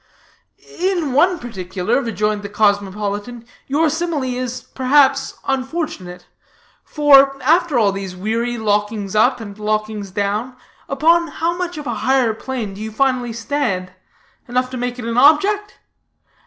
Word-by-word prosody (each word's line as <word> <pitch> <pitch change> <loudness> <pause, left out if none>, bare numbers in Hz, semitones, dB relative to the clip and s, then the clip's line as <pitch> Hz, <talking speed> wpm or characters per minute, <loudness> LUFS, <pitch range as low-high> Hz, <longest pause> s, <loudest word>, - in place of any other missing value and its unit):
"In 350 -7 0
one 350 +6 +3
particular," 200 - -2
rejoined 210 -3 -1
the 200 - -7
cosmopolitan, 205 +2 -1 0.2
"your 300 +4 +2
simile 320 -1 -1
is, 250 -1 -4
perhaps, 265 +1 +2
unfortunate. 260 - -3 0.6
For, 275 -2 +5
after 325 0 +3
all 210 -4 +3
these 195 -2 -6
weary 230 +5 -2
lockings 210 -1 -1
up 245 +4 +3
and 205 -2 -9
lockings 215 -1 -2
down, 205 +6 -2 0.3
upon 330 +5 +3
how 330 +3 -2
much 355 -2 -4
of 300 - -6
a 240 - -2
higher 260 -4 +2
plain 225 -3 -5
do 200 - -9
you 220 - -4
finally 255 0 0
stand? 225 -6 -2 0.5
Enough 255 +1 -1
to 255 - -5
make 245 0 -3
it 245 - -6
an 230 0 -2
object? 395 +9 +3
245 Hz, 140 wpm, -19 LUFS, 210-285 Hz, 0.6 s, For